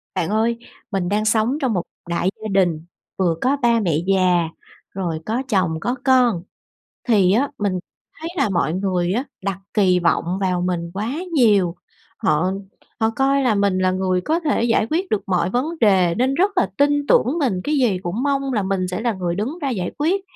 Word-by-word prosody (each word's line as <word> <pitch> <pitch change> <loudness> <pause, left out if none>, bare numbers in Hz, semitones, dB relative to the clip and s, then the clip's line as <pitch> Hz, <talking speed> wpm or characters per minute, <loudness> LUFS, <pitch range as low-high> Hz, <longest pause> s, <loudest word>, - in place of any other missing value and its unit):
Bạn 170 - -1
ơi, 225 +2 +1 0.3
mình 190 -3 -1
đang 210 +2 0
sống 220 +5 +2
trong 255 -5 +1
một 180 - 0 0.3
đại 175 +2 0
gia 220 - -4
đình, 175 -5 +1 0.3
vừa 175 -4 +1
có 270 +3 +2
ba 235 -1 +3
mẹ 170 -8 +1
già, 180 -3 +2 0.4
rồi 175 -4 -3
có 235 +5 -1
chồng, 185 -7 +1
có 245 +6 -1
con, 245 -9 +3 0.6
thì 200 -6 +4
á 260 +8 +2
mình 205 -2 0 0.5
thấy 325 +1 -5
là 215 - +2
mọi 175 -4 0
người 185 -1 0
á 245 +5 0 0.2
đặt 195 -1 -2 0.2
kỳ 185 -4 +3
vọng 170 -1 +1 0.2
vào 180 -2 0
mình 175 -2 -2
quá 210 +4 -3 0.2
nhiều. 205 - +3 0.4
Họ 160 +5 +1 0.5
họ 220 -1 +2
coi 275 +1 +2
là 240 -4 +2
mình 200 -2 +1
là 185 0 +2
người 185 -1 0
có 320 - 0
thể 300 -8 0
giải 225 -2 +2
quyết 360 +4 -1
được 210 - 0
mọi 180 -2 +1
vấn 245 +7 0
đề 185 -6 +4
nên 255 +4 +1
rất 385 +8 +2
là 365 - +2
tin 290 0 +2
tưởng 265 +8 +3
mình, 225 - 0
cái 300 - 0
gì 240 -9 +2
cũng 190 +9 -2
mong 275 -1 0
là 210 -4 0
mình 190 -1 -1
sẽ 185 - -3
là 235 -1 0
người 180 -3 -2
đứng 250 - -3
ra 280 - -1
giải 190 -8 -2
quyết. 350 +7 +1
205 Hz, 205 wpm, -21 LUFS, 180-250 Hz, 0.6 s, thì